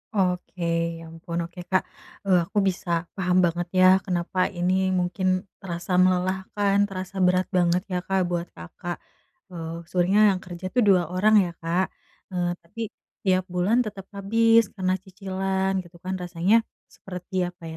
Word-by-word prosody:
Oke, 180 Hz, -1 st, -1 dB, 0.4 s
ya, 165 Hz, -, -10 dB
ampun, 165 Hz, +1 st, -5 dB
oke, 175 Hz, +1 st, -14 dB
Kak. 185 Hz, -, +3 dB, 0.4 s
Eee, 180 Hz, -3 st, +4 dB
aku 210 Hz, -, -7 dB
bisa 180 Hz, -1 st, -6 dB, 0.3 s
paham 180 Hz, -1 st, +1 dB
banget, 175 Hz, +1 st, -1 dB
ya, 185 Hz, -, +7 dB, 0.2 s
kenapa 180 Hz, -1 st, -2 dB
ini 180 Hz, 0 st, 0 dB, 0.3 s
mungkin 180 Hz, +1 st, -1 dB, 0.4 s
terasa 175 Hz, 0 st, -5 dB
melelahkan, 190 Hz, +2 st, +1 dB
terasa 190 Hz, 0 st, -7 dB
berat 185 Hz, +1 st, +3 dB
banget, 175 Hz, 0 st, +3 dB
ya, 180 Hz, -, -2 dB
Kak, 190 Hz, 0 st, 0 dB
buat 175 Hz, 0 st, -2 dB
Kakak. 175 Hz, -, -7 dB, 0.5 s
Eee, 165 Hz, -2 st, -5 dB, 0.2 s
sebenernya 185 Hz, +3 st, +3 dB
yang -, -, -4 dB
kerja 180 Hz, 0 st, -8 dB
itu 250 Hz, -, +1 dB
2 185 Hz, -3 st, +5 dB
orang, 215 Hz, +4 st, +4 dB
ya, 170 Hz, -, -4 dB
Kak. 175 Hz, +3 st, +1 dB, 0.5 s
Eee, 175 Hz, -1 st, 0 dB
tapi 180 Hz, +7 st, -10 dB, 0.4 s
tiap 185 Hz, -1 st, +3 dB
bulan 180 Hz, +6 st, +2 dB
tetap 205 Hz, -2 st, -6 dB
habis 225 Hz, +3 st, +4 dB
karena 185 Hz, -2 st, 0 dB
cicilan 190 Hz, 0 st, -2 dB
gitu, 175 Hz, 0 st, -18 dB
kan, 185 Hz, +1 st, -3 dB
rasanya 175 Hz, +3 st, +1 dB, 0.4 s
seperti 185 Hz, +1 st, -9 dB
apa, 175 Hz, -1 st, -12 dB
185 Hz, 150 wpm, -25 LUFS, 175-190 Hz, 0.5 s, ya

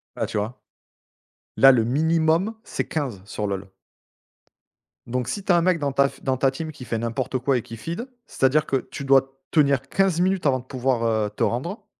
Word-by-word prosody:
Ah, -, -, -1 dB
tu -, -, -4 dB
vois? 110 Hz, +4 st, -3 dB, 1.0 s
Là, 135 Hz, 0 st, +8 dB
le 115 Hz, -3 st, +3 dB
minimum, 160 Hz, -, +2 dB
c'est -, -, -3 dB
15, 130 Hz, -12 st, -3 dB
sur 105 Hz, +1 st, -4 dB
LoL. 100 Hz, -1 st, -4 dB, 1.4 s
Donc 125 Hz, 0 st, -2 dB
si 200 Hz, -, -3 dB
tu 190 Hz, -, +1 dB
as 175 Hz, -, +5 dB
un -, -, +3 dB
mec 175 Hz, -1 st, +2 dB
dans 145 Hz, -1 st, -1 dB
ta 140 Hz, +1 st, +3 dB
f -, -, -17 dB
dans 130 Hz, -1 st, 0 dB
ta 135 Hz, +1 st, +2 dB
team 155 Hz, +3 st, -5 dB
qui 125 Hz, -, -11 dB
fait 115 Hz, -, -2 dB
n'importe 115 Hz, +3 st, -2 dB
quoi 130 Hz, +1 st, +1 dB
et -, -, -2 dB
qui 115 Hz, -, -10 dB
feed, 170 Hz, -, -5 dB, 0.2 s
c'est-à-dire 140 Hz, +3 st, +2 dB
que 135 Hz, -, +1 dB
tu 140 Hz, -, -6 dB
dois 135 Hz, 0 st, +3 dB
tenir 140 Hz, -4 st, +3 dB
15 190 Hz, -3 st, +2 dB
minutes 185 Hz, -1 st, +1 dB
avant 130 Hz, -3 st, +3 dB
de 125 Hz, -, -13 dB
pouvoir, 130 Hz, -2 st, -1 dB
heu, 110 Hz, -2 st, +1 dB
te -, -, -3 dB
rendre 170 Hz, -, -2 dB
135 Hz, 210 wpm, -24 LUFS, 120-160 Hz, 1.4 s, Là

